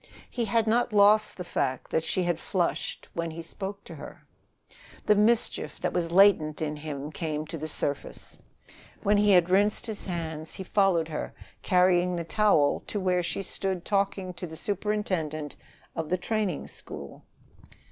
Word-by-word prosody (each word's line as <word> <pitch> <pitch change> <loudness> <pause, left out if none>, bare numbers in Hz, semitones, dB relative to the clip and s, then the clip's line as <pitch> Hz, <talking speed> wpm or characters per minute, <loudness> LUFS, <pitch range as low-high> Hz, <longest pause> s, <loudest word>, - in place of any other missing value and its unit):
He 240 -2 -1
had 230 0 +2
not 230 +1 +2
lost 210 +1 +5
the 180 - -4
fact 130 -6 -2
that 160 - +1
she 185 - 0
had 175 -2 0
flushed 175 -1 -2
when 170 0 -2
he 165 +1 -7
spoke 195 +4 -6
to - - -10
her. - - -11 0.8
The 210 - +6
mischief 220 +3 +2
that - - -1
was 170 -2 -1
latent 175 -5 +5
in 150 -1 -2
him 150 -1 -5
came 155 -1 -3
to 165 - -6
the 155 - -4
surface. 145 -2 -4 0.6
When 205 0 +4
he 205 0 +4
had 180 -2 +5
rinsed 205 +2 +3
his 220 -4 -5
hands, 160 -3 -4
he 190 - -5
followed 185 -4 +2
her, 155 - -5 0.3
carrying 180 -1 +3
the 170 - -2
towel 165 -5 +3
to 210 - -2
where 180 -2 +1
she 175 +3 -2
stood 190 -1 -2
talking 195 -2 0
to 175 +1 -6
the 160 - -9
superintendent 185 -8 -2 0.4
of 160 -2 -3
the 185 - +2
training 205 -3 -2
school. 70 -2 -10
180 Hz, 165 wpm, -28 LUFS, 160-205 Hz, 0.8 s, The